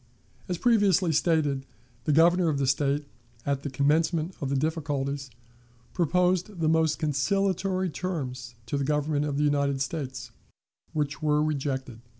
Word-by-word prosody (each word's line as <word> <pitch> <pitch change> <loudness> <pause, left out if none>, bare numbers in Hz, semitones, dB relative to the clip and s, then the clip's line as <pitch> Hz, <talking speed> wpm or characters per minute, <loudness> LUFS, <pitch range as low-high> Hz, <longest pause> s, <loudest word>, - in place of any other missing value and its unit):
As 180 - -1
previously 200 -6 +3
stated, 150 -4 +1 0.4
the 155 - +2
Governor 170 +3 +5
of 145 - 0
the 140 - +1
State, 140 +2 +1 0.4
at 140 -1 0
the 145 - -4
commencement 155 +5 +1
of 140 - -2
the 140 - 0
difficulties, 140 -2 -2 0.6
proposed 180 +2 +1
the 160 - +1
most 160 -1 +2
conciliatory 185 +4 0
terms 130 -9 -4
to 140 +4 -2
the - - 0
Government 150 +1 0
of 145 -2 -2
the 150 - +2
United 140 -2 +1
States, 135 -6 -4 0.6
which 145 -2 -2
were 150 -1 +2
rejected. 135 -5 -3
150 Hz, 145 wpm, -27 LUFS, 140-170 Hz, 0.6 s, Governor